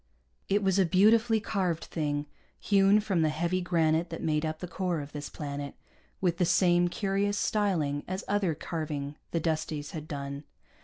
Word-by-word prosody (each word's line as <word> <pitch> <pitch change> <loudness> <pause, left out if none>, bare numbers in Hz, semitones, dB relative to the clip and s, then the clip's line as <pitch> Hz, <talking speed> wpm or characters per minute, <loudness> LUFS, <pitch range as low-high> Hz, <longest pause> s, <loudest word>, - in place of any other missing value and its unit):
It 205 +1 +2
was 190 0 +2
a - - +6
beautifully 220 +5 +4
carved 185 -6 -1
thing, 145 -2 -2 0.3
hewn 200 +1 +4
from 195 -5 0
the 155 - +3
heavy 170 +4 0
granite 165 -1 +1
that 165 - -6
made 155 -1 +1
up 155 0 -3
the 180 - -6
core 180 -2 -2
of 145 0 -7
this 145 -1 -6
planet, 140 -1 -5 0.4
with 175 -3 +1
the - - +4
same 175 0 +4
curious 200 +2 0
styling 170 -11 0
as 185 +2 -3
other 195 -5 +1
carving 150 -3 -4
the 165 - -1
Dusties 155 -2 -2
had 155 -1 -6
done. 140 -1 -5
170 Hz, 170 wpm, -29 LUFS, 150-195 Hz, 0.4 s, a